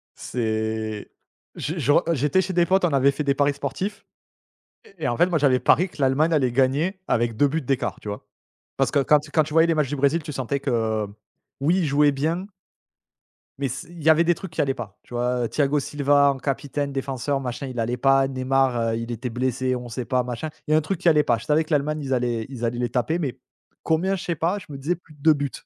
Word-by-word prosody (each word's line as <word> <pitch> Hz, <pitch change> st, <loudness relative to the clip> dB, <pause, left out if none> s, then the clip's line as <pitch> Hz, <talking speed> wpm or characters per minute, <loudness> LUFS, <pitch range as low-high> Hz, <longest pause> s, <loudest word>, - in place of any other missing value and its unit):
C'est 110 Hz, -2 st, -3 dB, 0.5 s
j 155 Hz, -, -3 dB
je 145 Hz, -3 st, +1 dB
re 160 Hz, -, +4 dB
heu, 170 Hz, -, +2 dB
j'étais 150 Hz, +8 st, +2 dB
chez 190 Hz, 0 st, -4 dB
des 175 Hz, 0 st, +3 dB
potes 190 Hz, +1 st, +3 dB
on 175 Hz, -, +2 dB
avait 140 Hz, +1 st, +4 dB
fait 145 Hz, +2 st, -3 dB
des 140 Hz, -, +2 dB
paris 145 Hz, 0 st, +2 dB
sportifs 185 Hz, +9 st, -4 dB, 0.8 s
et 180 Hz, -6 st, -14 dB
et -, -, +1 dB
en 120 Hz, -, -1 dB
fait, 175 Hz, -, +4 dB
moi 175 Hz, -3 st, +1 dB
j'avais 135 Hz, -3 st, +3 dB
parié 180 Hz, +3 st, +3 dB
que 155 Hz, -, -10 dB
l'Allemagne 145 Hz, +5 st, +3 dB
allait 130 Hz, -5 st, +2 dB
gagner 140 Hz, +9 st, +1 dB
avec 115 Hz, -1 st, 0 dB
2 145 Hz, -, +4 dB
buts 160 Hz, +4 st, -1 dB
d'écart, 135 Hz, -1 st, -2 dB
tu -, -, -11 dB
vois? 105 Hz, 0 st, -6 dB, 0.5 s
Parce -, -, +2 dB
que -, -, +3 dB
quand 150 Hz, +2 st, +4 dB
tu 150 Hz, +1 st, -13 dB
quand 155 Hz, -, +3 dB
tu 150 Hz, +1 st, -8 dB
voyais 165 Hz, +1 st, +5 dB
les 165 Hz, -, +2 dB
matchs 150 Hz, -4 st, +1 dB
du 145 Hz, -, -2 dB
Brésil, 145 Hz, +4 st, +1 dB
tu 150 Hz, -, -6 dB
sentais 135 Hz, +1 st, -2 dB
que, 110 Hz, -5 st, -1 dB, 0.5 s
oui, 160 Hz, +7 st, +2 dB
ils 180 Hz, -, +1 dB
jouaient 145 Hz, 0 st, +4 dB
bien 160 Hz, +7 st, -2 dB, 1.1 s
mais 140 Hz, 0 st, -1 dB
s 135 Hz, +3 st, -6 dB
il 170 Hz, -2 st, -11 dB
y 160 Hz, -, +4 dB
avait 160 Hz, +2 st, +6 dB
des 175 Hz, +1 st, +2 dB
trucs 190 Hz, -1 st, -9 dB
qui -, -, -1 dB
allaient 135 Hz, -1 st, +1 dB
pas, 105 Hz, -6 st, -8 dB
tu -, -, -15 dB
vois? 120 Hz, 0 st, 0 dB
Thiago 145 Hz, 0 st, +1 dB
Silva 140 Hz, 0 st, +3 dB
en 135 Hz, -, -5 dB
capitaine 140 Hz, +1 st, -3 dB
défenseur 135 Hz, +1 st, -2 dB
machin 130 Hz, +2 st, -4 dB
il 125 Hz, -2 st, -5 dB
allait 120 Hz, +2 st, -1 dB
pas, 135 Hz, +1 st, +4 dB
Neymar, 130 Hz, -1 st, +1 dB
heu, -, -, -1 dB
il 115 Hz, +1 st, -5 dB
était 120 Hz, +2 st, -4 dB
blessé, 130 Hz, +1 st, -1 dB
on 125 Hz, -1 st, -6 dB
sait 120 Hz, +2 st, -4 dB
pas 125 Hz, +1 st, +1 dB
machin. 125 Hz, +5 st, -4 dB, 0.2 s
Il -, -, -2 dB
y -, -, +5 dB
a -, -, +6 dB
un 155 Hz, -, +3 dB
truc 175 Hz, +3 st, -3 dB
qui 175 Hz, -2 st, +4 dB
allait 150 Hz, -2 st, +4 dB
pas. 115 Hz, -, +2 dB
Je 115 Hz, -, -10 dB
savais 155 Hz, +2 st, +3 dB
que 155 Hz, -, -14 dB
l'Allemagne 150 Hz, +2 st, +1 dB
ils 135 Hz, -1 st, -2 dB
allaient 120 Hz, -3 st, -1 dB
ils 125 Hz, -3 st, -7 dB
allaient 120 Hz, +1 st, -2 dB
les 120 Hz, -, 0 dB
taper 145 Hz, +7 st, 0 dB
mais 135 Hz, -6 st, -3 dB, 0.4 s
combien? 180 Hz, +5 st, +1 dB
Je 185 Hz, -, -6 dB
sais 170 Hz, -, -2 dB
pas, 170 Hz, +6 st, 0 dB
je 185 Hz, -, -13 dB
me 140 Hz, -, -7 dB
disais: 155 Hz, +6 st, -1 dB
«Plus 165 Hz, -2 st, -19 dB
de 150 Hz, -, -22 dB
2 160 Hz, 0 st, +6 dB
buts». 145 Hz, -2 st, -3 dB
140 Hz, 255 wpm, -24 LUFS, 125-155 Hz, 1.1 s, avait